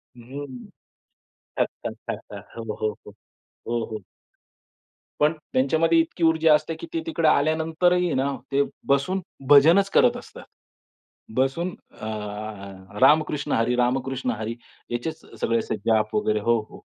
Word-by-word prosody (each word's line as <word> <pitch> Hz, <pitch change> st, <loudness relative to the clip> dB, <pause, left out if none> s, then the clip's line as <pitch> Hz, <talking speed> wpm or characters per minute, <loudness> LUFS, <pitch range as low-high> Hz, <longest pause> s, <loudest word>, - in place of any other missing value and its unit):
अ, 130 Hz, +4 st, -8 dB, 1.2 s
थकतात, -, -, -2 dB, 0.2 s
थकतात. -, -, -7 dB
हो, 115 Hz, -2 st, -4 dB
हो, 110 Hz, 0 st, 0 dB
हो. -, -, -9 dB, 0.6 s
हो, 120 Hz, -1 st, 0 dB
हो. 110 Hz, -2 st, -6 dB, 1.2 s
पण 150 Hz, +1 st, +4 dB, 0.2 s
त्यांच्यामध्ये 160 Hz, +5 st, +3 dB
इतकी 165 Hz, +1 st, -1 dB
ऊर्जा 160 Hz, -1 st, +5 dB
असते, 150 Hz, +2 st, 0 dB
की 160 Hz, -, -9 dB
ते 330 Hz, -, 0 dB
तिकडे 165 Hz, -, +1 dB
आल्यानंतरही 160 Hz, +4 st, +2 dB
ना, 135 Hz, +2 st, +1 dB, 0.2 s
ते 140 Hz, +1 st, +4 dB, 0.3 s
बसून 140 Hz, +8 st, +2 dB, 0.3 s
भजनच 165 Hz, +8 st, +6 dB
करत -, -, +4 dB
असतात. -, -, -11 dB, 0.9 s
बसून 135 Hz, +8 st, +1 dB, 0.3 s
अ, 110 Hz, -, -5 dB, 0.9 s
रामकृष्ण 150 Hz, -1 st, +3 dB
हरी, 115 Hz, +2 st, +2 dB
रामकृष्ण 125 Hz, +1 st, 0 dB
हरी 110 Hz, 0 st, -3 dB, 0.4 s
याचेच 120 Hz, +7 st, -3 dB, 0.2 s
सगळे 115 Hz, 0 st, +1 dB, 0.3 s
जाप 110 Hz, -2 st, +2 dB
वगैरे 215 Hz, 0 st, +1 dB
हो, 120 Hz, 0 st, +2 dB
हो. -, -, -13 dB
140 Hz, 125 wpm, -24 LUFS, 120-165 Hz, 1.2 s, भजनच